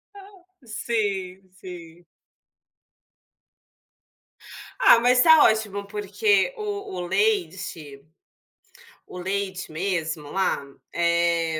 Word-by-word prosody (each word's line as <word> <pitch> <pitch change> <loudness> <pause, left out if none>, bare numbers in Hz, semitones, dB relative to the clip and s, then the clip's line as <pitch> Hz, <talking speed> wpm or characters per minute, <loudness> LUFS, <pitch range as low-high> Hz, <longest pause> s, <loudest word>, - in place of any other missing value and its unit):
Ah, 395 -2 -15 0.2
sim, 195 -5 -3
sim. 175 -2 -12 2.8
Ah, 235 - +7
mas 250 +1 +4
tá 320 +1 +7
ótimo 210 -2 0
porque 380 - +1
o 410 - -5
o 175 -1 -4
leite 190 - -2 1.0
o - - -11
leite 190 -1 -4
mesmo 160 -3 -3
lá, 190 -5 0 0.3
eh, 170 -1 +1
195 Hz, 85 wpm, -24 LUFS, 170-245 Hz, 2.8 s, Ah